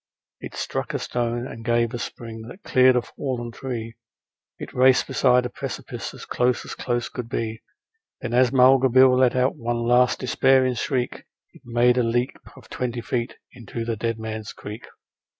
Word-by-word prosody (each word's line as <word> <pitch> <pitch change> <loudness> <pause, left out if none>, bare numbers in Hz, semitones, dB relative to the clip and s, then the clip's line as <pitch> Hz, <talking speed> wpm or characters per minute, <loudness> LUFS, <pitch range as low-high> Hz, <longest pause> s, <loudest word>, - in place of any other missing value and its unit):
It - - -9
struck - - -3
a - - +2
stone 120 0 -2
and 115 -3 -8
gave 115 0 +1
a 120 - -3
spring 115 -1 -7
that 185 +11 -12
cleared 130 0 +5
a 125 - +2
fallen 120 -4 -5
tree, 115 -3 -6 0.6
It - - -8
raced 130 0 +5
beside 125 -1 +3
a - - -2
precipice - - -6
as - - -10
close 125 0 0
as - - -6
close 120 -1 -2
could 120 -2 -7
be; 115 -1 -3 0.6
And 120 - -5
then 125 - +4
as 130 -1 +4
Mulga 130 0 +5
Bill 130 +1 +6
let 130 -1 +3
out 130 +1 +2
one 120 0 -2
last 120 +1 +4
despairing 130 0 +3
shriek 125 +1 -2 0.3
It - - -18
made 120 +1 +3
a - - +3
leap 120 +2 0 0.2
of - - -15
twenty 120 -1 -3
feet 120 0 -3 0.2
into 115 0 -6
the 115 -1 -1
Dead 115 +1 -2
Man's 110 -1 -6
Creek. 105 +3 -9
120 Hz, 185 wpm, -24 LUFS, 115-125 Hz, 0.6 s, Bill